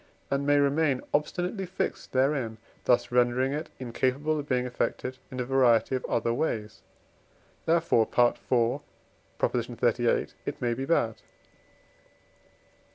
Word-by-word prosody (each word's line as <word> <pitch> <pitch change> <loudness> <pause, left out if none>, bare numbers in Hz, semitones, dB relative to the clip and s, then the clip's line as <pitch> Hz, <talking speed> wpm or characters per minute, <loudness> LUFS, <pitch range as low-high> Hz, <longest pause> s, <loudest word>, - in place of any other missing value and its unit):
and 140 +1 0
may 145 0 +5
remain 140 -1 +2
obstinately 180 +6 -1
fixed 185 0 -4
therein, 130 -4 +1 0.3
thus 120 0 +3
rendering 125 +2 +2
it 155 +2 -4
incapable 130 +5 -1
of 145 - -7
being 125 -1 +1
affected 130 +1 -3
in 130 - -6
a 125 - -1
variety 130 -2 +3
of 130 - -1
other 115 0 0
ways: 110 -6 -2 0.9
therefore 165 -9 +3
(IV. 120 -1 +2 0.6
xxxviii.) - - +1 0.2
it - - -5
may 120 -1 0
be 135 +3 -3
bad. 115 -7 +1
130 Hz, 120 wpm, -28 LUFS, 120-145 Hz, 0.9 s, may